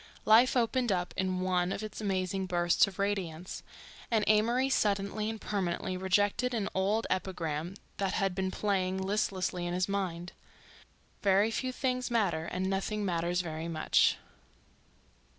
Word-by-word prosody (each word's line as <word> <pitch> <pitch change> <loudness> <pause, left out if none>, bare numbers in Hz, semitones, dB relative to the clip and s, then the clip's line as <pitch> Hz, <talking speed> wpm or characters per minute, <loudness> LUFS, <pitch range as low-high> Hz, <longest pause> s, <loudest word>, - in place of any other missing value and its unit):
Life 235 +4 +6
opened 240 0 +1
up 180 -1 -1
in 185 -1 -1
one 180 -1 +1
of 200 - -3
its 215 0 -6
amazing 190 -1 -1
bursts 175 +1 +3
of 195 - -9
radiance 185 -4 -2 0.5
and 220 -3 +2
Amory 235 +5 +3
suddenly 210 -3 0
and 220 0 -5
permanently 185 -2 -2
rejected 205 +6 +1
an 205 -3 -1
old 200 +4 +1
epigram 175 -2 -2 0.2
that 195 -1 -1
had 195 -2 +1
been 190 0 -1
playing 190 -2 0
listlessly 190 -2 -1
in 175 - -2
his 185 0 +1
mind: 180 -3 -3 0.9
"Very 200 +2 +3
few 255 +3 -2
things 255 -1 -1
matter 190 -9 +1
and 185 +2 -2
nothing 200 +2 -1
matters 175 0 0
very 160 -1 -5
much." 160 -2 +3
190 Hz, 145 wpm, -31 LUFS, 180-210 Hz, 0.9 s, Life